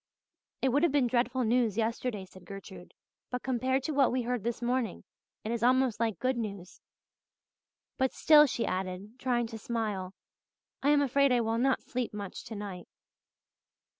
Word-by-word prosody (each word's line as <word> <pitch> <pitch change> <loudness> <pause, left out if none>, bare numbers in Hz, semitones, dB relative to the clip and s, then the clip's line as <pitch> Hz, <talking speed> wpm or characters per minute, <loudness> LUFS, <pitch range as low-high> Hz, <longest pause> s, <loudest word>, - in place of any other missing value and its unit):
"It 265 - +4
would 280 +4 +2
have 340 -3 +3
been 280 -2 +3
dreadful 245 +1 +1
news 230 -2 +2
yesterday," 225 -2 -1
said 185 0 -16
Gertrude, 190 -1 -10 0.3
"but 250 0 -4
compared 260 +1 0
to 315 - -2
what 275 -3 +3
we 250 0 0
heard 245 -3 -2
this 235 0 -2
morning 245 -4 -1 0.4
it 220 - -3
is 235 -1 -2
almost 255 -2 +3
like 225 -5 0
good 255 0 0
news. 200 -5 -6 1.2
But 265 0 +2
still," 300 -1 +6
she 240 -3 -1
added, 190 +5 -4
trying 245 -2 +1
to 225 -1 -7
smile, 210 -5 -3 0.7
"I 280 - +2
am 290 -1 +5
afraid 280 0 +3
I 245 -1 +3
will 225 0 0
not 265 +1 +2
sleep 245 -4 -3
much 200 -2 -6
tonight." 200 -5 -7
240 Hz, 165 wpm, -30 LUFS, 210-260 Hz, 1.2 s, still